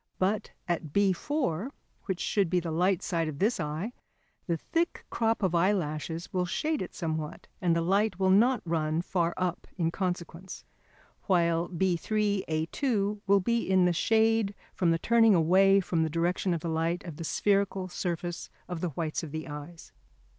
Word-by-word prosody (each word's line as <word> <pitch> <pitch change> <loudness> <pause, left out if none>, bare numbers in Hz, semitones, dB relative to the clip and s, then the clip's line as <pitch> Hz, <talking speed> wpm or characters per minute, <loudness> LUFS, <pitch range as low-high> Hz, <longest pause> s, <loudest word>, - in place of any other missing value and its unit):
But 195 +3 0 0.2
at 175 -2 -1
B4, 200 - 0 0.4
which 190 -2 -2
should 200 -5 +1
be 180 +1 +2
the 170 -1 -4
light 180 +3 +1
side 165 -3 -1
of 150 -2 -5
this 210 +5 +1
eye, 160 +9 -3 0.5
the 170 -2 0
thick 335 - -2
crop 225 -1 0
of 185 -2 +2
eyelashes 170 -3 0
will 180 -1 0
shade 310 - -1
it 185 - -6
somewhat 155 -2 -4 0.2
and 170 -2 +2
the 165 - +1
light 195 +2 +2
will 190 -1 +3
not 235 +6 +4
run 160 0 0
far 170 -2 0
up 180 -1 -2
in 165 -2 +1
consequence, 180 0 -4 0.6
while 170 -3 +2
B3, 190 +3 0
A2 200 - -1
will 200 0 +5
be 235 +5 +1
in 185 -1 +4
the 180 - +3
shade 220 +2 +2 0.2
from 175 - +1
the 165 - +3
turning 225 +2 +4
away 190 +4 +5
from 175 -3 0
the 160 - +1
direction 175 +3 0
of 165 - -4
the 170 - -4
light 165 +2 -1
of 165 -5 -8
the 165 - -5
spherical 195 +1 +1
surface 175 -1 -4 0.2
of 175 -3 -5
the 180 - 0
whites 155 +1 -3
of 160 - -7
the 155 +1 -5
eyes. 150 +3 -9
180 Hz, 175 wpm, -29 LUFS, 165-200 Hz, 0.6 s, will